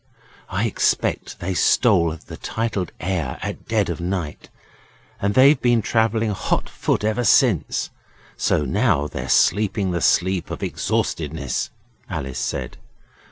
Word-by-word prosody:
'I 95 +5 0
expect 115 - 0
they 95 +2 -2
stole 90 -2 +3
the - - -8
titled 110 -5 -3
heir 85 -7 -2
at - - -6
dead - - +1
of - - -4
night, 85 -4 -4 0.7
and 100 +1 0
they've 135 +2 +6
been 120 -3 +3
travelling 110 -1 +1
hot 100 - -1
foot - - -1
ever 110 +3 0
since, 110 - +2 0.4
so 75 - +1
now 90 - +2
they're 65 -3 -5
sleeping 100 - +2
the 85 -1 -1
sleep 95 0 +2
of - - -5
exhaustedness,' 75 -3 -2 0.4
Alice 65 -2 -4
said. - - -4
95 Hz, 130 wpm, -22 LUFS, 80-110 Hz, 0.7 s, they've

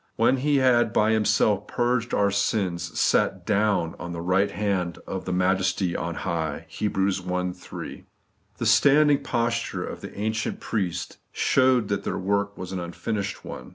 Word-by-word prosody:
*When 120 +4 +3
He 145 +3 +1
had 120 -4 +3
by 110 +1 +3
Himself 110 -1 +2
purged 120 -1 0
our 100 0 +2
sins, 90 -4 -1
sat - - +2
DOWN 100 -5 +1
on 85 +1 -6
the 85 - -5
right 90 +3 +2
hand 95 -5 -1
of 95 - -5
the 90 - -3
Majesty 90 0 +1
on 85 0 -3
high 80 -3 -3
' - - -32
(Heb. 105 -2 -1
i. 90 -2 0
3). 90 0 -9 0.5
The - - -3
standing 145 0 +5
posture 115 -1 -1
of - - -7
the - - -9
ancient 110 +1 -2
priests 90 -5 -3
showed 130 -4 +3
that 100 - -1
their - - -2
work 100 +1 -1
was 90 0 -6
an 95 - -3
unfinished 95 +4 -4
one. 65 - -8
100 Hz, 165 wpm, -25 LUFS, 90-115 Hz, 0.5 s, standing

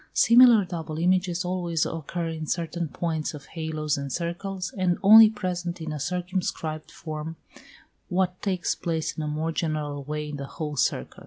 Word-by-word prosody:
Similar 235 -3 +7
double 165 -3 -5
images 180 +1 +1
always 175 -3 0
occur 165 +1 -4
in 160 -1 -5
certain 170 0 -2
points 160 -1 -3
of 140 -2 -11
halos 155 -2 -2
and 140 -1 -5
circles, 180 +4 -4
and 185 -3 +1
only 220 +2 +10
present 180 -4 -4
in 160 -1 -5
a 150 - -4
circumscribed 175 -2 -3
form 155 0 -6 0.7
what 180 0 0
takes 185 -3 0
place 165 -3 -2
in - - -4
a 150 - -3
more 155 +2 -2
general 150 -3 -2
way 150 +1 -4
in 145 - -5
the 140 -1 -6
whole 150 -1 -5
circle. 115 - -1
165 Hz, 165 wpm, -26 LUFS, 155-180 Hz, 0.7 s, only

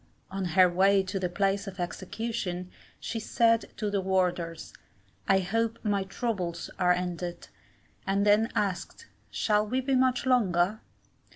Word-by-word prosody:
On 195 0 -3
her 185 -1 +8
way 195 +2 +3
to 190 +1 -3
the 180 -1 -1
place 195 +2 0
of 190 -1 -8
execution, 185 0 -4 0.3
she 230 - -4
said 230 +1 +2
to 210 -2 -2
the 200 -1 0
warders, 180 -3 -1 0.5
I 195 0 +4
hope 225 +4 -1
my 200 -2 +1
trubles 190 -6 -3
are 180 -1 +4
ended, 175 -1 -3 0.6
and 195 +1 +1
then 210 +2 +4
asked, 195 -3 -2 0.2
'Shall 210 0 +1
we 255 +4 0
be 265 +1 -1
much 255 0 +2
longer? 210 -5 +2
195 Hz, 145 wpm, -28 LUFS, 180-220 Hz, 0.6 s, her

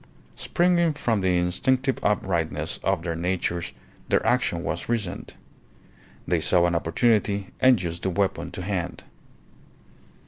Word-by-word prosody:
Springing 170 -2 +2
from 115 -7 0
the 90 -1 +2
instinctive 125 +10 0
uprightness 80 -6 -1
of 95 -4 0
their 85 -1 -2
natures 85 0 -2 0.4
their - - +2
action 85 0 +1
was 85 +7 -4
reasoned. 110 -6 -3 0.9
They - - +2
saw 90 -1 +3
an 85 - +1
opportunity 100 +3 +1
and 130 -4 +5
used 85 -1 -4
the 95 - 0
weapon 95 +1 -1
to 90 - -5
hand. 90 -3 -3
95 Hz, 130 wpm, -25 LUFS, 85-110 Hz, 0.9 s, and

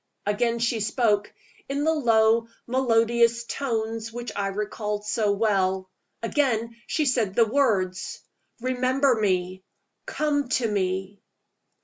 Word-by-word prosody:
Again 235 +3 +1
she 230 0 0
spoke, 210 -1 +1 0.4
in 280 +1 -1
the 320 +1 +3
low, 230 -5 +3 0.2
melodious 235 -1 +2
tones 225 -4 -3
which 240 -1 -6
I 200 -1 -1
recalled 210 +1 -3
so 210 -1 +1
well. 190 -3 0 0.3
Again 230 -3 0
she 305 - 0
said 230 -7 +1
the 230 - +5
words: 205 -7 0 0.4
"Remember 255 +2 +2
me. 185 -4 -1 0.4
Come 295 - 0
to 250 -2 +1
me." 190 -1 -2
225 Hz, 115 wpm, -25 LUFS, 205-245 Hz, 0.4 s, the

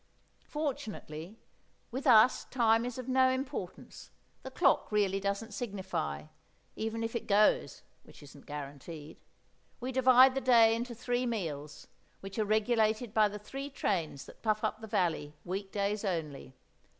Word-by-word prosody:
Fortunately, 215 - -5 0.5
with 265 +4 -3
us 240 0 +6
time 230 -2 +2
is 245 0 -5
of 255 -1 -6
no 260 0 +4
importance, 260 -7 -5 0.3
the - - -7
clock - - +2
really 200 -2 +1
doesn't 200 +3 -3
signify, 190 - -4 0.5
even 225 +1 -3
if 225 +1 -4
it 235 - -3
goes, 210 +1 +2 0.2
which - - -16
isn't 140 0 -15
guaranteed; 145 +2 -8 0.6
we 255 +1 -4
divide 260 0 +6
the 270 - -2
day 230 -3 +6
into 235 +1 -3
three 245 +2 -1
meals, 155 -10 -4 0.3
which 195 +3 -7
are 215 - +2
regulated 220 +1 +1
by 215 -2 +5
the 205 0 -6
three 270 +7 -7
trains 165 - -2
that - - -15
puff 215 -1 0
up - - -2
the 220 - -7
valley, 165 -8 -1
week 190 +2 -4
days 205 +1 -1
only. 155 -8 -4
215 Hz, 150 wpm, -31 LUFS, 185-245 Hz, 0.6 s, us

